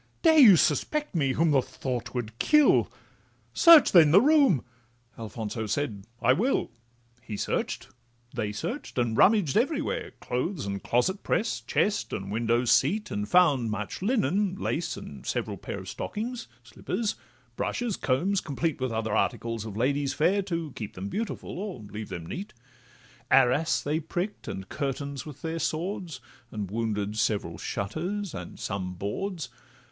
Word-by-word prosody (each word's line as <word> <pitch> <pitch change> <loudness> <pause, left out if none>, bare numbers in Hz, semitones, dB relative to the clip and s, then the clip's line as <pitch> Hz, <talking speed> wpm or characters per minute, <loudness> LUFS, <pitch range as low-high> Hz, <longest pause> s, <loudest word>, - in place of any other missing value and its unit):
Dare 320 -2 +6
you 220 -9 +10
suspect 295 - +1
me, 140 -6 +1
whom 165 +2 +2
the 135 -2 +4
thought 125 -2 -5
would 115 -2 -4
kill? 300 -2 +4 0.6
Search, 335 -3 +8
then, 165 -5 +7
the 175 +6 +7
room!'—Alfonso 120 - 0
said, 105 -5 -2 0.2
'I 125 - +6
will.' 230 - 0 0.5
He 110 -2 -6
search'd, - - -2 0.5
they 105 -1 -2
search'd, 235 - -5
and 120 -2 +1
rummaged 195 - +4
everywhere, 285 +7 0
Closet 135 - -2
and 100 0 -4
clothes' 125 +10 +2
press, 225 - -1
chest 205 0 0
and 100 0 -4
window 115 +2 +1
seat, 185 - +2
And 105 0 -3
found 145 -10 +4
much 105 - -4
linen, 205 -3 +1
lace, - - -2
and - - -9
several - - -2
pair - - -6
Of - - -8
stockings, 235 +3 -5 0.2
slippers, 205 - -3 0.4
brushes, 235 - -2
combs, 180 +9 0
complete, 150 0 -2
With 130 -2 -1
other 110 -1 -1
articles 115 -2 -1
of 105 -2 -7
ladies 140 +3 0
fair, 190 +6 +3
To 170 -5 -3
keep 105 -4 -7
them 95 +2 -5
beautiful, 215 - -4
or 200 - -5
leave 105 +1 -7
them 85 -3 -6
neat: 195 - -6 0.8
Arras 135 +5 +3
they 150 +2 0
prick'd 175 +6 -4
and 95 0 -5
curtains 140 +1 -4
with 150 - -11
their 165 0 -2
swords, 165 -2 -3 0.3
And 105 -4 -5
wounded 105 -1 -2
several 100 -6 -1
shutters, 175 - -3
and 90 -2 -8
some 90 -2 -4
boards. 160 - -4
140 Hz, 150 wpm, -27 LUFS, -, 0.8 s, you